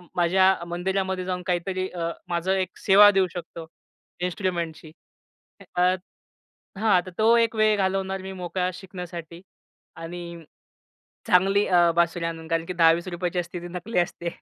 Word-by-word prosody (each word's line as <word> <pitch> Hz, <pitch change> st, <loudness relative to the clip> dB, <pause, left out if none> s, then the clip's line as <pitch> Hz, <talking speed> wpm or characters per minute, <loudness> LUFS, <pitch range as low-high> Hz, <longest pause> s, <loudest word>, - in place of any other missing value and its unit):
माझ्या 185 Hz, +2 st, +4 dB
मंदिरामध्ये 190 Hz, +2 st, -2 dB
जाऊन 180 Hz, -1 st, -3 dB
काहीतरी 185 Hz, +1 st, -1 dB
अ, 170 Hz, -2 st, -3 dB, 0.2 s
माझं 175 Hz, +2 st, -1 dB
एक 190 Hz, -2 st, -1 dB
सेवा 205 Hz, +1 st, +8 dB
देऊ 195 Hz, -2 st, +2 dB
शकतो 170 Hz, -1 st, -7 dB, 0.6 s
इन्स्ट्रुमेंटची. 170 Hz, -3 st, -3 dB, 0.8 s
अ, 180 Hz, -, +1 dB, 1.0 s
हां, 220 Hz, 0 st, +2 dB
आता 180 Hz, +1 st, 0 dB
तो 225 Hz, +2 st, +5 dB
एक 230 Hz, -1 st, +2 dB
वेळ 215 Hz, -1 st, +3 dB
घालवणार 190 Hz, 0 st, -1 dB
मी 190 Hz, 0 st, -7 dB
मोकळा 180 Hz, 0 st, -2 dB
शिकण्यासाठी 175 Hz, -2 st, -9 dB, 0.5 s
आणि 170 Hz, +2 st, -7 dB, 1.1 s
चांगली 195 Hz, +1 st, +4 dB
अ, 175 Hz, -2 st, +4 dB
बासुरी 170 Hz, 0 st, +1 dB
आणून. 165 Hz, -1 st, -5 dB
कारण, 165 Hz, 0 st, 0 dB
की 180 Hz, -, -4 dB
10-20 170 Hz, 0 st, +3 dB
रुपयाची 180 Hz, 0 st, -3 dB
असते, 175 Hz, 0 st, -4 dB
ती 175 Hz, -, -7 dB
नकली 180 Hz, +5 st, -4 dB
असते. 175 Hz, 0 st, -1 dB
180 Hz, 140 wpm, -25 LUFS, 170-190 Hz, 1.1 s, सेवा